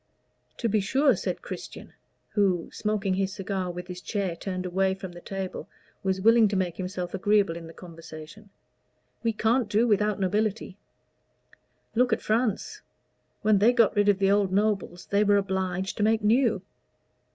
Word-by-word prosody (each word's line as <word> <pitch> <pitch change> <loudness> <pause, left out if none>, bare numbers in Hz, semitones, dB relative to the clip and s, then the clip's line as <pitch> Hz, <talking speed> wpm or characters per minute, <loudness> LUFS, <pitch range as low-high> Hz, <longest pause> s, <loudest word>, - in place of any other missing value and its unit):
"To 235 - -1
be 215 -1 +2
sure," 265 +6 +3
said 180 -1 -4
Christian, - - -8 0.4
who, 190 -5 +1
smoking 210 -2 -1
his 195 0 0
cigar 190 -2 -3
with 180 0 -6
his 180 0 -8
chair 195 -5 -2
turned 185 +1 -4
away 190 +1 +1
from 190 -2 -8
the 175 0 -11
table, 195 0 -6 0.3
was 190 0 -1
willing 225 +1 +6
to 200 - -2
make 180 -3 -1
himself 180 -1 -4
agreeable 200 -2 +2
in 165 -1 -8
the - - -10
conversation. 165 +4 -11 0.7
"We 230 - +1
can't 225 +2 +1
do 225 +4 +3
without 210 -1 +2
nobility. 205 +1 -1 1.2
Look 245 +1 +2
at - - +1
France. 235 - -1 0.6
When 210 -1 +4
they 225 +5 +5
got 230 -4 +3
rid 205 0 +3
of 200 - +4
the 195 0 +2
old 200 -2 +2
nobles 200 -3 0
they 200 +1 +2
were 205 -1 +4
obliged 190 -1 -2
to 210 - 0
make 220 0 +2
new." 225 -3 +3
200 Hz, 165 wpm, -27 LUFS, 185-215 Hz, 1.2 s, willing